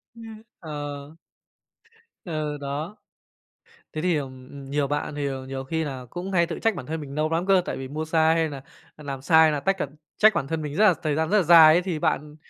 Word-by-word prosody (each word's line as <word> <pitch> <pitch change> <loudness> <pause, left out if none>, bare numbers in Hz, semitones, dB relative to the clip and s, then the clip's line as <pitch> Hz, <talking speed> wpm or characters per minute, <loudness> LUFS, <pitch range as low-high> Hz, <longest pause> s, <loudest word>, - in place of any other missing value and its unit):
Ưm, 225 -2 -11 0.2
ờ. 145 -1 -7 1.1
Ừ, 155 -3 -3
đó. 145 +7 -4 1.0
Thế 155 - -3
thì, 180 0 +1
ừm, 130 -2 -7
ừm, 140 -1 -10
nhiều 145 0 0
bạn 145 +1 -3
thì 145 -1 -2 0.2
nhiều 135 0 -5
khi 160 +4 -2
nà 135 -4 -6
cũng 180 +5 -6
hay 170 -2 +3
tự 165 - -5
trách 225 -2 +1
bản 135 - -7
thân 160 +3 -4
mình 140 -1 -8
nâu 155 +1 0
lắm 165 +2 -1
cơ 195 -1 +4
tại - - -4
vì 135 - -6
mua 155 +4 -4
xa 160 0 +3
hay 165 -1 +1
nà, 140 -2 -8 0.3
ờ, 150 - -14
làm 135 -2 -5
sai 160 +2 +5
là 150 - -1
tách, 195 +6 0
ờ 160 - -2 0.3
trách 215 0 +6
bản 135 - -2
thân 160 +2 -3
mình 150 -1 -5
rất 210 - +3
là 185 - +5
thời 150 -2 0
gian 160 +1 0
rất 210 - +3
là 200 - +3
dài 160 -1 +8
ấy, 175 - +3
thì 180 -4 -3
bạn 150 -2 -1
155 Hz, 240 wpm, -24 LUFS, 145-170 Hz, 1.1 s, dài